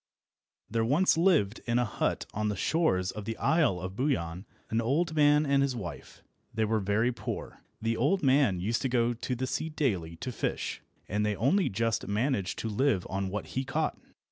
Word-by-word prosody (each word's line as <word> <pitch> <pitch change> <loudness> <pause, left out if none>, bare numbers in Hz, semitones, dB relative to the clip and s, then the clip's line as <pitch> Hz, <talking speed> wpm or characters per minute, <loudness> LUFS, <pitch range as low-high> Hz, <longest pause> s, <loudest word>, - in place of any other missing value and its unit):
THERE 115 +1 0
once 150 +11 +3
lived 160 - +2
in 120 0 +2
a 125 - +2
hut 110 - -1
on 105 +1 -1
the 105 - -1
shores 95 - +1
of 105 -2 -7
the 115 - -4
Isle 155 - +2
of 95 +1 -6
Buyan 95 - -1 0.2
an 115 +1 +2
old 155 +8 +1
man 150 0 +4
and 140 -1 +3
his 140 -2 +1
wife. 85 -10 -8 0.3
They 110 0 0
were 110 +1 +1
very 105 +5 +1
poor. - - -6 0.2
The 115 0 +1
old 160 +9 +2
man 130 -8 +4
used 110 +6 -1
to 135 - 0
go 120 -1 +2
to 125 +2 -3
the 130 +2 -2
sea 135 +5 -2
daily 100 - -1
to 125 - -5
fish, - - -3 0.3
and 105 +2 0
they 105 -1 0
only 165 - +2
just 115 +2 -1
managed 105 -2 0
to - - -3
live 110 -3 +1
on 95 0 -1
what 105 +2 -4
he 130 - 0
caught. 150 +4 -1
115 Hz, 195 wpm, -29 LUFS, 100-140 Hz, 0.3 s, man